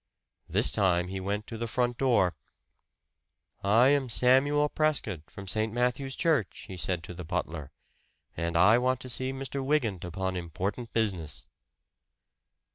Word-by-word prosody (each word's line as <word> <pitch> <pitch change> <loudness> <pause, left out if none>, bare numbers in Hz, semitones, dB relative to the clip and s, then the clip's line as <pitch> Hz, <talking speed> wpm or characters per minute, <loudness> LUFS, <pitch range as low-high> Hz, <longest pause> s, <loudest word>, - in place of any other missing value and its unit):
This - - +3
time 90 -2 +2
he 95 0 -4
went 100 +3 -2
to 115 0 -7
the 115 - -2
front 120 +1 -1
door. 120 -9 +3 1.3
"I 115 +6 +5
am 140 -3 +2
Samuel 135 +5 +4
Prescott, 140 - -1
from 100 -1 -10
St. 110 +3 0
Matthew's 125 +3 -1
Church," 155 - 0
he 95 - -7
said 90 -1 -1
to 90 - -8
the 90 +1 -7
butler. 75 -2 -4 0.6
"And 85 +1 -1
I 105 +7 +6
want 130 +1 +1
to 130 - -7
see 130 +2 -1
Mr. 135 0 -4
Wygant 125 - 0
upon 95 +2 -3
important 90 +7 -4
business." 90 - -1
110 Hz, 145 wpm, -29 LUFS, 90-130 Hz, 1.3 s, I